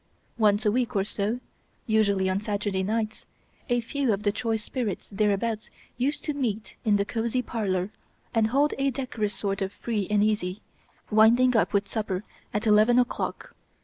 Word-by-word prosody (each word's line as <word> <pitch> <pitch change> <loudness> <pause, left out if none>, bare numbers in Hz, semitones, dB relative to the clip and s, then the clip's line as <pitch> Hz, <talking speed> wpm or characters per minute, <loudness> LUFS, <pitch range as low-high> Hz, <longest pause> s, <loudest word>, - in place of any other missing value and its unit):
Once 210 -1 +3
a 210 - +4
week 250 +1 0
or 195 - +3
so 210 +3 -2 0.5
usually 200 -4 +2
on 190 +1 +1
Saturday 205 -2 -1
nights 215 +2 -2 0.4
a 245 0 +2
few 265 +1 0
of 205 0 -1
the 205 - +3
choice 220 0 -1
spirits 225 -7 -3
thereabouts 210 +2 0 0.3
used 270 +5 -1
to 300 - 0
meet 225 -6 -3
in 215 -3 +3
the 200 0 +1
cosy 235 +3 -1
parlor 195 -5 -1 0.4
and 225 -2 +3
hold 280 +6 +2
a 275 0 +2
decorous 235 -6 -3
sort 195 0 -2
of 190 0 -1
free 210 -2 -2
and 210 -1 +3
easy, 210 -2 -1 0.5
winding 235 +4 +5
up 220 - +3
with 200 -1 +1
supper 210 -4 -2 0.3
at 210 +2 -2
eleven 215 +3 +5
o'clock. 245 -1 -1
215 Hz, 170 wpm, -26 LUFS, 205-235 Hz, 0.5 s, winding